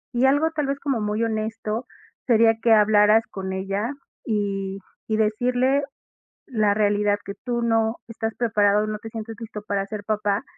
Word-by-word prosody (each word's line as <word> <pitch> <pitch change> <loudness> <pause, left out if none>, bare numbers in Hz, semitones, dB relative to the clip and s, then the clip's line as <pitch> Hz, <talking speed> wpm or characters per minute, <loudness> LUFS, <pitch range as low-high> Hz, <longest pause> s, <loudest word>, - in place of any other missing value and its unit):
y 245 +2 +3
algo 290 +4 +3
tal 300 -3 -2
vez 275 0 -2
como 270 -6 -1
muy 210 +2 -1
honesto, 220 +1 -2 0.4
sería 225 -2 +5
que 235 - +3
hablaras 215 0 +5
con 190 -2 -5
ella, 195 +5 -2 0.3
y 195 -3 -2 0.3
y 220 -1 0
decirle 245 +5 +2 0.6
la 215 -6 +2
realidad, 205 -1 +2
que 200 - -5
tú 240 -1 -1
no 225 0 +1
estás 225 -1 -4
preparado, 210 -2 +2
no 215 -1 -4
te 225 - -8
sientes 225 0 -7
listo 220 -2 -7
para 200 -1 -1
ser 210 -1 -6
papá. 210 +1 0
220 Hz, 165 wpm, -23 LUFS, 205-235 Hz, 0.6 s, sería